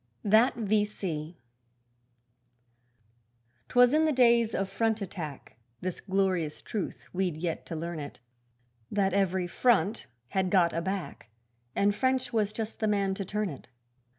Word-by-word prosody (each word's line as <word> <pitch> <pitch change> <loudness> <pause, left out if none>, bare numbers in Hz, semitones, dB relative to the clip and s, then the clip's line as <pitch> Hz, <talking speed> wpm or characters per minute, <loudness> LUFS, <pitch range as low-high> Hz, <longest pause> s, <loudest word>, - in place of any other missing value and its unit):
That 220 +5 +4
V.C. 200 -7 -1 2.3
'Twas 245 +1 +5
in 315 +1 +4
the 310 - +3
days 235 -4 +4
of 195 - 0
front 220 +3 0
attack, 165 - -7 0.2
This 185 -1 -4
glorious 185 -5 0
truth 210 -4 -4
we'd 180 -4 -1
yet 165 0 -3
to 165 - -5
learn 170 +1 -4
it 145 -1 -8 0.7
That 195 -2 +1
every 190 -2 +1
'front' 225 +3 +1 0.2
had 190 -1 0
got 175 -3 +3
a 165 - -1
back, 190 - -4 0.5
And 205 +1 +3
French 260 +1 0
was 215 -2 +1
just 220 0 -5
the 220 - +1
man 200 -2 +1
to 195 - -3
turn 210 +1 -2
it. 140 - -11
195 Hz, 140 wpm, -29 LUFS, 180-220 Hz, 2.3 s, Twas